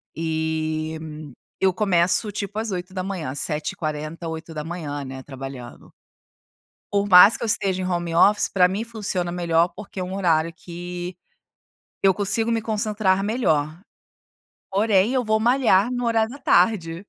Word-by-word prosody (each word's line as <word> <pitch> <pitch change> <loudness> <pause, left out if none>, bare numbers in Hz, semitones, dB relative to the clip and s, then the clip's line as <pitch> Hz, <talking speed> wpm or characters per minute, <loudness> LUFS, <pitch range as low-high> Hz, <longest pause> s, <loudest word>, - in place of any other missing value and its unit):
e 160 -1 -2 0.6
eu 190 -1 +3
começo 185 +1 +2
tipo 205 +1 -5
às 220 -2 -3
8h, 185 -5 -4
7:40, 155 +2 -3
8h, 160 -2 -5
né, 130 0 -7
trabalhando. 135 -3 -9 1.0
Por 200 0 +1
mais 180 +4 +9
que - - -9
eu 235 - -1
esteja 190 -3 +1
em 185 - -2
home 175 -2 -2
office, 205 +5 +4
pra 180 -2 +5
mim 200 +5 -3
funciona 200 -6 -3
melhor, 170 -1 +1
porque 205 -2 -9
é - - -1
um 185 +1 -6
horário 165 -3 +1
que 175 +1 -7 0.9
eu 195 -1 +5
consigo 210 +4 0
me 225 -1 0
concentrar 210 -3 0
melhor. 160 - 0 0.9
Porém, 205 +2 +2
eu 255 - +1
vou 220 -1 +1
malhar 240 -2 +3
no 245 -1 -2
horário 225 -1 +1
da 280 - -9
tarde. 175 -7 +2
180 Hz, 140 wpm, -23 LUFS, 160-210 Hz, 1.0 s, mais